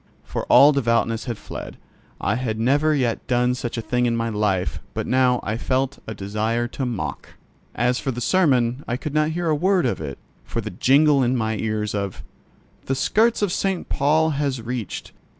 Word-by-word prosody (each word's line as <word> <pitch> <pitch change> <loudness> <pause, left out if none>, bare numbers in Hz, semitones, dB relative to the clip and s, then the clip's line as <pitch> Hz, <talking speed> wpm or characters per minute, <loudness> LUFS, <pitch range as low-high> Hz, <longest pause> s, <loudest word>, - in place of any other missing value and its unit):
For - - -4
all 145 +2 +7
devoutness 115 -4 +1
had 120 -4 -4
fled. - - -8 0.4
I 100 - 0
had 110 -2 -2
never 145 +6 +3
yet 125 -5 -1
done 125 0 +2
such 125 -1 -4
a 115 - -3
thing 125 +2 +1
in 115 - +1
my 115 0 -1
life, 105 -4 0 0.2
but - - -2
now 125 -1 +3
I 110 +1 -2
felt 130 +3 -1
a 110 - -5
desire 110 +4 -1
to 130 +1 -3
mock. 115 -5 -5 0.4
As 125 +1 +1
for - - -3
the 120 -2 -3
sermon, 130 -5 +2
I 120 - -1
could 150 +2 -5
not 155 0 +2
hear 170 +1 -2
a 155 - +3
word 180 +3 +2
of 120 - -1
it 70 -3 -5 0.3
for - - -4
the 110 -1 -4
jingle 140 - +4
in 125 0 +2
my 110 -1 -1
ears 110 -1 -2
of 100 -2 -4 0.6
"The 135 - +1
skirts 220 - +2
of 200 - +1
St. 190 -1 -1
Paul 155 +2 +2
has 140 -3 -1
reached. 115 -2 -5
125 Hz, 195 wpm, -22 LUFS, 115-145 Hz, 0.6 s, all